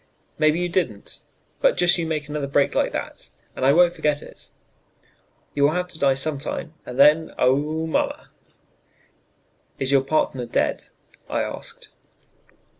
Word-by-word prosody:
"Maybe 155 +1 +3
you 180 - 0
didn't. 165 - -3 0.4
But - - +3
just 175 0 +4
you 165 - -2
make 155 -2 -3
another 150 -2 -3
break 140 0 +2
like - - +1
that, - - -6 0.3
and - - -5
I 135 - +5
won't 175 +3 +5
forget 150 -3 -1
it; - - -13 1.0
you 145 - -2
will 145 +2 +4
have 180 +1 -2
to 160 - -6
die 135 -1 +3
sometime, 150 +2 -3
and 125 - -7
then, 150 +3 +5
oh, 150 +5 +1
mamma!" 160 - -2 1.5
"Is 135 0 0
your 135 -1 +5
partner 135 -3 -1
dead?" - - -1 0.4
I - - 0
asked. - - -7
150 Hz, 150 wpm, -23 LUFS, 140-160 Hz, 1.5 s, I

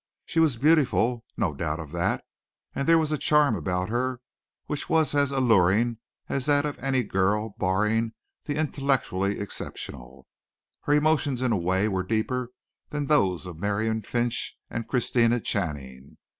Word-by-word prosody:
She 165 - -1
was 155 -7 +3
beautiful 125 -5 +3
no 95 -9 0
doubt 75 +2 -3
of 80 -3 -8
that. 85 0 -1 0.5
And 140 - -2
there 165 0 +6
was 155 -2 0
a 150 - 0
charm 150 -6 +3
about 90 +2 -2
her 125 +2 -1 0.5
which 150 - -4
was 160 -4 +2
as 145 -1 +2
alluring 115 -3 +3 0.3
as 135 0 -2
that 145 0 +3
of 145 - -4
any 130 -1 +1
girl 105 +2 0
barring 105 +5 +1 0.3
the 145 - -2
intellectually 135 -10 0
exceptional. 65 -9 -7 0.6
Her 145 - +2
emotions 145 -4 +2
in 125 - +1
a - - +3
way 95 +3 +1
were 95 -3 0
deeper 115 +5 -1 0.4
than 145 -1 -2
those 95 - +2
of 85 -3 -8
Miriam 110 +3 0
Finch 120 +1 -2
and 115 -1 -4
Christina 120 -1 +2
Channing. 70 - -4
115 Hz, 155 wpm, -26 LUFS, 95-140 Hz, 0.6 s, there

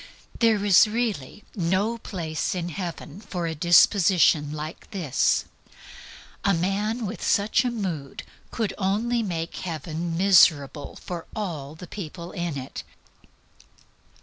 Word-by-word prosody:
There 220 -3 +3
is 200 +1 +7
really 215 - -3
no 195 +5 0
place 165 -6 -3
in 175 -1 -3
heaven 170 -1 -6
for 180 -5 -4
a 165 - -2
disposition 170 -2 +4
like 155 +1 -7
this. 165 -10 +1 1.0
A 200 - +3
man 205 +7 -1
with 210 +3 -5
such 210 +3 +2
a 250 - 0
mood 180 - -4 0.3
could 225 -3 -2
only 220 +5 +1
make 170 -5 -4
heaven 165 0 -4
miserable 155 -7 +4
for 175 -2 -7
all 160 -9 -4
the 180 - -10
people 170 -2 -8
in 175 -5 -3
it. 130 0 -6
180 Hz, 120 wpm, -25 LUFS, 160-205 Hz, 1.0 s, is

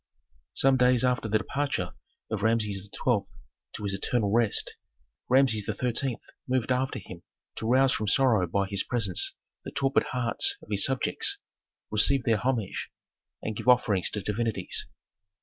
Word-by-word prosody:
Some 135 0 +4
days 125 -1 +4
after 125 -3 0
the 110 - +3
departure 140 +5 -3 0.4
of 110 -2 -2
Rameses 105 -3 +1
XII. 120 -5 +1 0.5
to - - -7
his 100 -1 -1
eternal 100 +1 -1
rest, 115 -2 +2 0.5
Rameses 130 -5 +3
XIII. 125 0 -1 0.3
moved 130 -1 0
after 130 +1 0
him 90 -3 -10 0.4
to 110 - -3
rouse 130 +2 +4
from 105 -3 -1
sorrow 110 -5 +3
by 100 +3 0
his 100 -1 +1
presence 110 -7 +1 0.3
the - - -6
torpid 135 -1 +1
hearts 120 -4 0
of - - -16
his 100 -1 +4
subjects, 135 -2 0 0.5
receive 120 +5 +4
their 115 -3 +2
homage 115 -3 -2 0.5
and 110 - -3
give - - -6
offerings 110 -7 +3
to 105 - -4
divinities. 105 -3 -2
115 Hz, 150 wpm, -27 LUFS, 105-125 Hz, 0.5 s, Some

